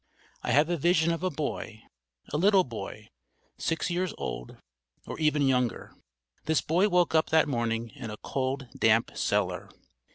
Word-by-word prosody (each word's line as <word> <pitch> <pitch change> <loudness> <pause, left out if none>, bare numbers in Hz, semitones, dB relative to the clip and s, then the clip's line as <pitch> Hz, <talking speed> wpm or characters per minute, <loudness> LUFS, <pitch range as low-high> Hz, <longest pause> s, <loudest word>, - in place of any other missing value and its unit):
I - - -4
have 150 +3 +4
a 175 0 0
vision 170 +1 +3
of 165 - -2
a 185 - +1
boy, 140 -8 -5 0.5
a - - +2
little 195 +1 +5
boy, 110 - -8 0.5
six 165 +2 -1
years 180 +1 -1
old - - -5 0.5
or - - -7
even 150 -2 +2
younger. 125 -3 0 0.5
This 160 -1 +2
boy 180 +6 +2
woke 180 -3 +2
up 160 -1 +3
that 160 -1 +4
morning 115 -3 -1
in 130 -6 -7
a 105 - -6
cold 135 +1 -3
damp 115 +1 +3
cellar. - - -1
150 Hz, 160 wpm, -28 LUFS, 115-170 Hz, 0.5 s, little